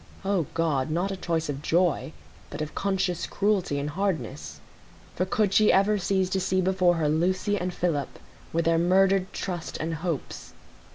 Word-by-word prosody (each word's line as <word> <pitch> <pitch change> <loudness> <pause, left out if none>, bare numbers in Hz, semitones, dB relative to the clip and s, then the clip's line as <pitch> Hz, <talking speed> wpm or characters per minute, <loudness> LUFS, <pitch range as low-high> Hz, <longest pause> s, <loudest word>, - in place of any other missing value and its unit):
O 190 -7 +1
God! 155 -5 0
not 175 +5 -1
a - - -2
choice 165 -3 -2
of 145 -1 -4
joy, 170 0 +1 0.4
but 145 - -7
of 155 0 -4
conscious 190 -3 -1
cruelty 200 -7 0
and 145 +1 -3
hardness; 155 - -3 0.6
for 185 - -1
could 200 0 +1
she 215 +1 +5
ever 200 +2 +3
cease 190 0 +1
to 190 - +1
see 185 0 0
before 185 -1 +3
her 160 -2 0
Lucy 185 +6 +1
and 180 -2 -2
Philip, 165 -6 -2 0.3
with 165 0 0
their 165 0 +3
murdered 190 +2 +3
trust 175 -3 -4
and 165 +1 -3
hopes? 165 -1 -5
180 Hz, 170 wpm, -26 LUFS, 160-190 Hz, 0.6 s, she